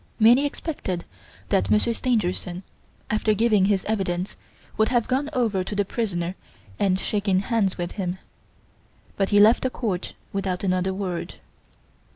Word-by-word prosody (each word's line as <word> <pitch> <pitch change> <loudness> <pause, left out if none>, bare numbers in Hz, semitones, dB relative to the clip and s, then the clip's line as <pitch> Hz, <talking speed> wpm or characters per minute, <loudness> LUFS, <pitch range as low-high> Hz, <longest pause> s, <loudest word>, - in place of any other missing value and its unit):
Many 240 +6 +6
expected 235 - -4 0.4
that 95 +1 +2
Monsieur 105 - +3
Stangerson, 185 -7 -1 0.5
after 215 0 +2
giving 215 -3 +3
his 195 -2 +1
evidence, 190 -3 -1 0.4
would 220 0 +2
have 240 -3 +1
gone 270 +3 0
over 220 -7 +1
to 205 - -5
the 205 0 +1
prisoner 185 -5 -2 0.5
and 190 -2 +2
shaken 200 -2 0
hands 200 -3 0
with 175 -1 -3
him; 185 -2 -3 1.0
but 195 -1 0
he 205 - +5
left 215 +3 +6
the 260 - +1
court 210 -8 -3 0.2
without 195 -2 -2
another 185 0 +1
word. 190 -3 -4
200 Hz, 145 wpm, -24 LUFS, 185-225 Hz, 1.0 s, Many